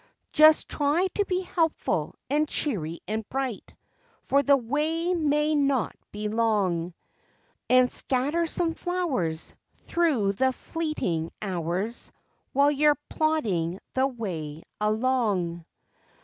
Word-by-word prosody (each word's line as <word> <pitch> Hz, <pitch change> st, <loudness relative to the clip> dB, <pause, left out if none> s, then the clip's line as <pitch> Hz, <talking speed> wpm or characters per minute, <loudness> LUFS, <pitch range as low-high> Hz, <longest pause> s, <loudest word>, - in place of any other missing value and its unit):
Just 310 Hz, 0 st, +6 dB
try 300 Hz, +5 st, +1 dB
to 410 Hz, -, +1 dB
be 365 Hz, -1 st, 0 dB
helpful 330 Hz, -3 st, -1 dB
and 300 Hz, +2 st, +1 dB
cheery 170 Hz, -, -2 dB
and 220 Hz, +1 st, -2 dB
bright 260 Hz, -5 st, -4 dB, 0.5 s
For 280 Hz, +2 st, +3 dB
the 280 Hz, 0 st, +5 dB
way 310 Hz, +8 st, 0 dB
may 300 Hz, -2 st, +2 dB
not 280 Hz, -4 st, +1 dB, 0.2 s
be 210 Hz, +1 st, -4 dB
long, 200 Hz, -6 st, 0 dB, 0.7 s
And 255 Hz, 0 st, +5 dB
scatter 290 Hz, +6 st, 0 dB
some 330 Hz, 0 st, 0 dB
flowers 285 Hz, -, -2 dB, 0.3 s
Thru 275 Hz, -13 st, +1 dB
the 260 Hz, +5 st, +1 dB
fleeting 250 Hz, -, -2 dB
hours 185 Hz, +3 st, -3 dB, 0.4 s
While 280 Hz, +2 st, +4 dB
you're 295 Hz, 0 st, +3 dB
plodding 205 Hz, -, 0 dB, 0.2 s
the 260 Hz, +1 st, +2 dB
way 165 Hz, -, -5 dB, 0.2 s
along. 210 Hz, -7 st, 0 dB
260 Hz, 110 wpm, -26 LUFS, 200-305 Hz, 0.7 s, Just